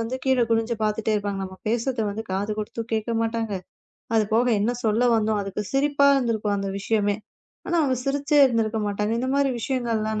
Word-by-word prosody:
வந்து 230 +3 -2
கீழே 260 -2 +3
குனிஞ்சு 225 +1 +1
பாத்துட்டே 215 +1 0
இருப்பாங்க. 200 -1 -2
நம்ம 190 0 -9
பேசறத 235 +1 0
வந்து 220 +2 -5
காது 200 +3 -1
குடுத்துக் 225 +2 -5
கேட்கமாட்டாங்க. 225 -1 -1 0.6
அது 220 -1 +4
போக 240 +2 +3
என்ன 215 +4 +2
சொல்ல 220 +2 +2
வந்தோம் 215 -1 +1
அதுக்கு 195 +1 -4
சிரிப்பா 280 +1 +3
இருந்திருக்கும் 220 -5 0
அந்த 195 0 -3
விஷயமே. 205 -1 +1 0.5
ஆனா 345 - 0
அவுங்க 265 -3 +1
சிரிச்சே 285 +1 +2
இருந்திருக்க 225 -3 0
மாட்டாங்க. 210 +2 -1
இந்த 260 - -2
மாரி 280 -1 +2
விஷயங்கள்லாம் 225 -3 -1
225 Hz, 170 wpm, -24 LUFS, 210-245 Hz, 0.6 s, அது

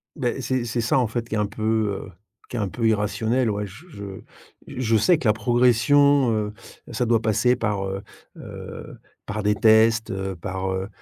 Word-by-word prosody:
Beh, 130 -2 -2
c'est 125 0 -1
c'est 120 +1 -3
ça, 115 - +1
en 125 -3 +2
fait, 115 +1 -4
qui 110 - -3
est - - 0
un 105 - +1
peu, 105 +2 -9 0.5
heu, - - -12 0.4
qui - - -7
est - - -1
un 100 -2 -1
peu 115 -2 -1
irrationnel. 110 +3 +1
Ouais 105 0 -2
j 95 - -13 0.2
je 100 -10 -9 0.6
j - - -9
je 115 -3 +1
sais 165 - +4
que 135 - -2
la 105 - +5
progression, 125 +3 +3
heu, 105 -1 -1 0.4
ça 120 +2 -1
doit 115 -1 +2
passer 110 +3 +2
par, 105 -4 -1
heu 95 +1 -4 0.4
heu, - - -9 0.3
par 105 +1 -4
des 105 0 +2
tests, 110 +1 +4
heu, 95 -1 -4
par, 95 +2 -3
heu 95 +1 -3
110 Hz, 205 wpm, -23 LUFS, 105-120 Hz, 0.6 s, la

